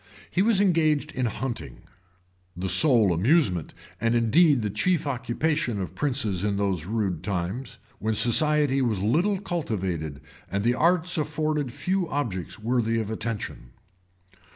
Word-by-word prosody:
He 185 - +1
was 215 -1 +4
engaged 155 -6 +2
in 130 -4 -1
hunting, 120 +3 -5 0.7
the 95 +1 -2
sole 110 - +4
amusement, 95 - +1 0.2
and 115 +1 +1
indeed 120 +3 +4
the 105 - -2
chief 165 - 0
occupation 130 -1 -1
of 95 - -5
princes 125 -10 -1
in 100 -1 0
those 95 -5 -1
rude 100 -7 -1
times, 95 +6 -4 0.2
when 110 0 -1
society 135 +4 +3
was 110 -7 0
little 175 - +2
cultivated 95 - -3 0.3
and 100 0 -2
the 120 +2 +3
arts 170 +4 +1
afforded 150 -3 -1
few 185 +5 -1
objects 115 - -3
worthy 115 0 0
of 110 -1 -3
attention. 110 - -5
120 Hz, 135 wpm, -25 LUFS, 100-155 Hz, 0.7 s, was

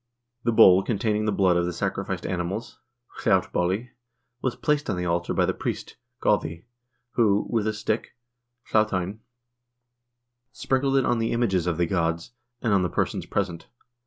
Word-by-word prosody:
The 115 - +2
bowl 95 -4 +7
containing 105 0 0
the 110 - +1
blood 95 -3 +3
of 85 0 +1
the - - -1
sacrificed - - -3
animals 95 +5 -3 0.4
(hlautbolli) 95 +8 +1 0.5
was 125 -2 -1
placed 150 +2 0
on 95 - 0
the 90 - -2
altar 85 0 0
by - - +2
the - - 0
priest - - -4 0.3
(godi), 85 +2 0 0.5
who, 105 -5 +2
with 110 -2 +1
a - - +2
stick 110 +1 -2 0.6
(hlautteinn), 105 -2 +1 1.3
sprinkled 135 0 +1
it 135 - +3
on 120 -1 +1
the 115 - 0
images 95 -7 +1
of 85 -2 0
the 85 - +2
gods, 85 +1 -1 0.3
and 115 -4 +2
on 100 - +4
the 90 - 0
persons - - -2
present. 90 -5 -2
100 Hz, 160 wpm, -25 LUFS, 90-115 Hz, 1.3 s, bowl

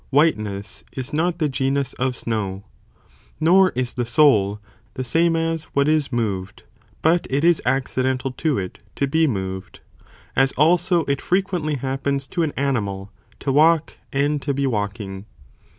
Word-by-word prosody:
whiteness, 105 -9 0
is 130 +3 -5
not 170 +3 +1
the 155 -3 +1
genus 135 0 -1
of 130 0 -1
snow, 100 -5 -3 0.8
nor 185 +4 +5
is 125 -1 -1
the 125 - -1
soul, 115 -5 +3 0.4
the 130 - -3
same 165 +6 +2
as 165 -1 -1
what 140 0 +3
is 155 -3 +1
moved, 100 -6 -3 0.4
but 165 +2 +3
it 140 +3 0
is 170 -1 +4
accidental 130 0 0
to 150 +3 -1
it, 95 -2 -5 0.2
to 140 - +1
be 160 +3 +2
moved, 95 -5 -4 0.6
as 135 +1 +3
also 170 +2 +3
it 140 -1 -1
frequently 180 -5 0
happens 135 +1 -2
to 175 - -3
an 160 -3 +1
animal, 100 -8 -1 0.3
to 135 - -2
walk 160 +3 +3
and 145 +1 0
to 140 0 -2
be 140 0 0
walking. 100 -4 -3
135 Hz, 150 wpm, -22 LUFS, 115-155 Hz, 0.8 s, nor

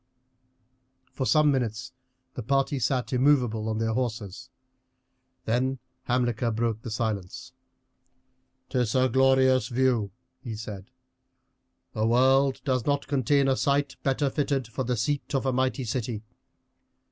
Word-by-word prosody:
For 130 - -3
some 150 -2 +4
minutes 125 -1 -2 0.4
the - - -5
party 135 +3 0
sat 125 +1 -1
immovable 125 -5 +2
on 110 - -1
their 110 0 0
horses, 115 -1 -4 1.0
then 130 +4 0 0.3
Hamilcar 120 -1 0
broke 115 -1 -1
the 115 - -7
silence: 110 +2 -4 1.2
"'Tis 125 -3 0
a 130 0 +3
glorious 130 -2 +3
view," 120 -4 +1 0.3
he 120 -4 -6
said; 105 -3 -8 1.0
"the 110 -1 0
world 130 +3 +3
does 130 -4 0
not 145 0 +1
contain 140 0 +2
a 135 - +3
site 140 +1 0
better 135 0 0
fitted 140 -4 -1
for 125 +3 -4
the 125 0 -1
seat 140 +5 -2
of 135 - 0
a 130 - +1
mighty 130 +1 0
city. 115 -2 -3
125 Hz, 130 wpm, -26 LUFS, 115-135 Hz, 1.2 s, some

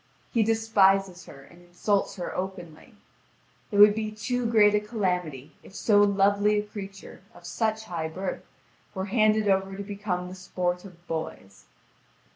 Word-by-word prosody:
He 230 - +2
despises 195 -4 +2
her 135 -1 -13
and 175 +5 -18
insults 180 +3 -1
her 180 -3 -5
openly. 185 +3 -7 0.8
It 205 - -1
would 205 0 +8
be 215 0 -3
too 240 +3 -2
great 210 -2 +5
a 210 - +3
calamity 180 - -3
if 190 - -16
so 205 -2 +3
lovely 205 +1 +3
a 210 - 0
creature 195 -2 -10
of 175 - -15
such 220 +4 -1
high 170 -6 -4
birth 185 +4 -5 0.5
were 190 0 -2
handed 215 -2 +3
over 195 0 +1
to 200 - -5
become 200 -3 -4
the 180 - -9
sport 180 0 -3
of 175 -2 -15
boys. 160 - -6
195 Hz, 155 wpm, -26 LUFS, 180-210 Hz, 0.8 s, would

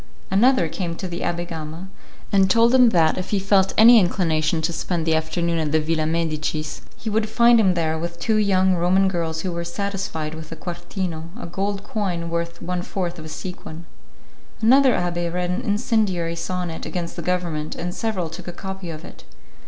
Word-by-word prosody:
Another 220 -1 +4
came 170 +1 -4
to 185 - -5
the 170 -1 -5
Abbé 175 0 -2
Gama, 160 +2 -7 0.4
and 195 -1 +4
told 230 +4 +4
him 250 -2 +7
that, 165 -4 +3
if 185 - -5
he 205 - +1
felt 195 0 +3
any 230 +1 +9
inclination 165 -4 +1
to 170 +2 0
spend 170 0 -2
the 165 - +2
afternoon 165 +1 0
at 155 -2 -1
the 155 - +3
Villa 155 0 0
Medicis, 155 -2 -2 0.2
he - - -9
would 215 0 0
find 235 +1 +5
him 190 -4 +3
there 160 -2 0
with 170 +1 -5
two 220 +4 +1
young 190 -3 +3
Roman 180 +2 +3
girls 165 -3 -2
who 185 - -3
were 170 0 -3
satisfied 170 -4 -3
with 160 0 -9
a - - -5
'quartino', 175 -1 -5
a - - -6
gold 195 +3 -3
coin 180 -6 -3
worth 170 0 -3
one 180 0 -2
fourth 175 -1 -4
of 155 - -9
a - - -8
sequin. 170 -1 -7 0.7
Another 260 +4 +5
abbé 175 -1 -1
read 180 0 -1
an 185 +6 -1
incendiary 205 -7 0
sonnet 170 0 -4
against 175 -2 -4
the - - -5
government, 170 -4 -2
and 175 +1 -4
several 210 -6 -2
took 170 +3 -9
a - - -3
copy 190 0 -7
of 155 -1 -7
it. - - -13
175 Hz, 195 wpm, -22 LUFS, 165-195 Hz, 0.7 s, any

